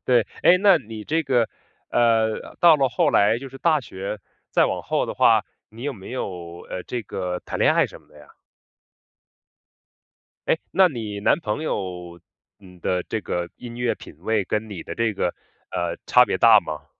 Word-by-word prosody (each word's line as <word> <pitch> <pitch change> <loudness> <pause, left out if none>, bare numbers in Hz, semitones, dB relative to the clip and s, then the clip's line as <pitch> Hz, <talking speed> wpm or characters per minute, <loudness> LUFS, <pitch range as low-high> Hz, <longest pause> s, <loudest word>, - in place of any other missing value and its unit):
对， 120 -4 +3 0.2
诶， 180 - +7
那 195 -2 +6
你 110 -4 -9
这 160 +2 0
个 125 -6 +1 0.4
呃， 115 -2 +1
到 170 -3 +7
了 135 -2 +2
后 155 +3 +1
来 105 -2 +3
就 135 +2 -8
是 135 - -12
大 155 0 +2
学 100 -3 -6 0.3
再 - - +4
往 - - -3
后 - - -1
的 - - -5
话， - - +4 0.2
你 115 +3 -12
有 145 0 -2
没 95 -5 -11
有， 85 -8 -6
呃， 90 - -4
这 120 -2 -4
个 90 -3 -4
谈 - - -5
恋 - - +4
爱 - - +3
什 - - -13
么 - - -28
的 75 - -18
呀？ 75 - -16 2.2
诶， - - +2
那 190 -1 +5
你 110 -8 -5
男 145 - +3
朋 130 +2 -3
友， 90 - -4 0.4
嗯 90 -2 -16
的 90 +1 0
这 110 - -3
个 85 -3 -3
音 120 -1 -9
乐 120 -1 0
品 - - -13
味 105 +2 0
跟 110 +1 -2
你 95 -5 -7
的 - - -6
这 115 -1 0
个， 90 -3 -1 0.4
呃， 85 -1 -2
差 125 - +6
别 - - -1
大 115 -2 +7
吗？ 75 -5 -7
110 Hz, 205 characters per minute, -23 LUFS, 95-130 Hz, 2.2 s, 诶